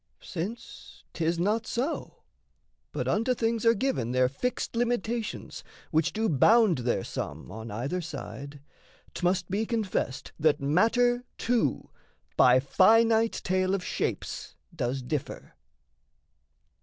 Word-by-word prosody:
Since 200 +7 -7
'tis 170 +1 0
not 210 +6 0
so, 265 +7 -3 0.7
but - - -3
unto 250 +4 +1
things 230 -1 0
are 230 - +6
given 195 - -1
Their 130 0 +4
fixed 235 - -3
limitations 235 -1 -2 0.3
which 160 +1 +2
do 220 +1 0
bound 200 - +4
Their 120 0 0
sum - - -6
on 110 +3 -7
either 135 - -3
side, 145 -3 -8 0.5
'tmust 180 0 0
be 205 +3 +1
confessed 210 - -2
That 155 -1 +3
matter, 230 - +2
too, 230 - 0 0.4
by 125 0 +6
finite 225 - +4
tale 185 +1 +1
of 190 - -4
shapes - - -3 0.2
Does 130 -3 -2
differ. 145 +2 -5
185 Hz, 120 wpm, -28 LUFS, 140-230 Hz, 0.7 s, are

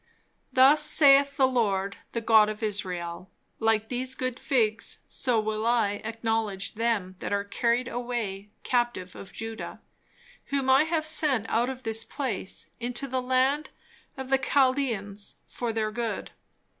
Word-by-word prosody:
"Thus 265 +3 +6
saith 280 -1 +5
the 265 - +5
Lord, 200 -6 0 0.2
the 230 - -1
God 220 -2 +5
of 215 +1 -6
Israel, 180 -4 -3 0.3
Like 220 -1 +2
these 255 +2 -2
good 255 -1 -3
figs, 225 -4 0
so 245 -4 +1
will 215 0 -2
I 225 -3 +1
acknowledge 225 -3 -2
them 210 -5 -1
that - - -4
are 200 0 +1
carried 235 +4 0
away 235 -5 -4
captive 240 -7 -1
of 195 - -10
Judah, 225 0 -6 0.7
whom 275 -2 +1
I 270 +4 +6
have 320 -1 0
sent 285 -8 0
out 240 +3 +1
of 260 -1 -7
this 225 0 0
place 230 -8 -4
into 245 +3 -3
the 260 0 -1
land 260 +4 +1 0.5
of 265 -1 -6
the 270 - +4
Chaldeans 255 -7 0
for 240 -2 -3
their 220 -1 -1
good. 230 0 -3
230 Hz, 145 wpm, -27 LUFS, 215-260 Hz, 0.7 s, Thus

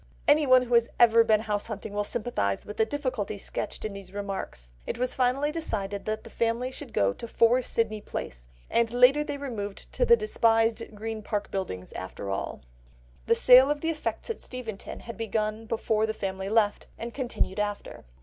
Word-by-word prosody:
Anyone 285 -4 +6
who 245 -1 -4
has 235 0 +4
ever 230 -1 +7
been 215 -1 +3
house 210 -2 -2
hunting 215 -1 -6
will 205 0 0
sympathise 205 - -1
with 210 - -8
the 220 - +3
difficulties 255 -8 -3
sketched - - -4
in 215 - -3
these 195 -2 -9
remarks. 195 - -5 0.2
It - - -3
was 250 +1 0
finally 265 +4 +1
decided 205 -11 -3
that 215 0 -2
the - - -11
family 235 +2 0
should 265 -2 -9
go 100 0 +2
to 235 - -8
4 235 +2 +4
Sydney 220 -3 -1
Place, - - -6 0.2
and 235 -1 +1
later 250 +5 +5
they 290 - -4
removed 215 -8 -6
to - - +1
the 470 -1 +6
despised 225 - +2
Green 220 +1 -5
Park 210 -1 -3
Buildings 130 - -4
after 100 +1 -6
all. 95 - -4 0.7
The - - +5
sale 255 +2 +8
of 295 0 0
the 325 - 0
effects 325 +8 -4
at 455 - -7
Steventon 235 -5 -7
had 230 - -8
begun 220 0 -2
before 220 -1 0
the 220 - -3
family 190 -1 -3
left, 210 -1 +2
and 235 0 -6
continued 240 -6 -2
after. 205 0 -4
225 Hz, 190 wpm, -27 LUFS, 205-250 Hz, 0.7 s, sale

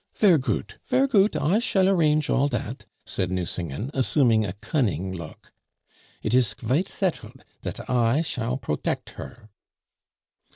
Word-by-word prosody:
"Ver' 185 -7 +5
goot, 130 - -3
ver' 260 +2 +3
goot, 210 -6 +3
I 185 +8 +2
shall 195 -5 +2
arrange 155 -5 +3
all 140 +2 +2
dat," - - -4 0.2
said 95 - -2
Nucingen, 90 - -3
assuming 125 -4 +3
a 95 -4 -3
cunning 100 - -1
look. 85 -4 -10 0.7
"It 110 - -1
is 125 -5 +3
qvite 140 - 0
settled 185 -4 -3 0.2
dat - - -6
I 125 +4 +2
shall 125 -4 -2
protect 120 - -3
her." 105 - -11
130 Hz, 135 wpm, -25 LUFS, 105-165 Hz, 0.7 s, Ver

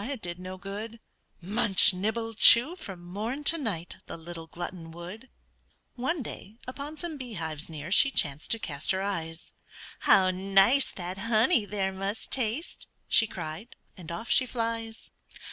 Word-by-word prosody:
it 280 -4 -4
did 175 -2 -6
no 185 +1 -7
good; 210 +4 -7 0.4
Munch, 200 0 +5
nibble, 220 +4 -2
chew, 240 +8 +7
from 190 - -9
morn 220 +10 -4
to 320 - +3
night, 205 - -4
The - - -7
little 165 0 -8
glutton 175 0 -7
would. 180 +9 -9 0.6
One 265 +4 -2
day, 215 -2 -9
upon 285 +4 -7
some 335 -3 -5
bee 250 -4 -7
hives 160 -4 -5
near 155 +1 -7
She 275 - +6
chanced 145 - 0
to 230 - +3
cast 150 -9 -4
her 190 0 +2
eyes; 165 -4 -5 0.5
"How 185 -1 +5
nice 195 +8 +4
that 180 +1 -6
honey 230 - +4
there 195 -2 -2
must 195 +3 -5
taste!" 255 +5 -1 0.2
She 225 - +5
cried, 175 +4 -7 0.2
and 170 -3 -9
off 170 +7 -5
she 255 - +4
flies. 230 -2 -4
200 Hz, 160 wpm, -28 LUFS, 175-235 Hz, 0.6 s, chew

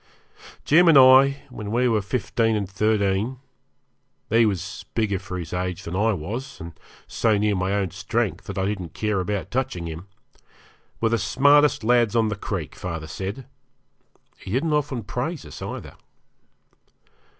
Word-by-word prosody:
Jim 170 +4 +5
and 160 -4 +7
I, 135 +1 +7
when 105 -4 -7
we 120 +3 +2
were 110 -3 +2
fifteen 115 +1 0
and 100 -2 -2
thirteen 105 +3 0 0.9
he 115 0 +5
was 95 -4 -4
bigger 105 -4 0
for 90 -1 -6
his 85 -2 -6
age 90 -1 -3
than 85 - -5
I 110 +4 +2
was, 115 - -6
and 85 0 -8 0.3
so 110 -3 +1
near 105 0 +1
my 95 +1 -1
own 100 -3 -1
strength 105 -2 -2
that 100 - -7
I 95 - 0
didn't 95 -5 -4
care 105 -2 0
about 100 +1 -3
touching 130 -9 -2
him 85 +3 -7 0.9
were 115 - +2
the 115 0 +1
smartest 145 +7 +4
lads 120 -1 +3
on 110 -2 +3
the 105 - -2
creek, 95 -7 -5
father 85 -3 -5
said 95 - -6 0.9
he - - -11
didn't 140 - 0
often 145 -5 -1
praise 130 - -4
us, - - -10
either. - - -6
105 Hz, 160 wpm, -23 LUFS, 95-125 Hz, 0.9 s, and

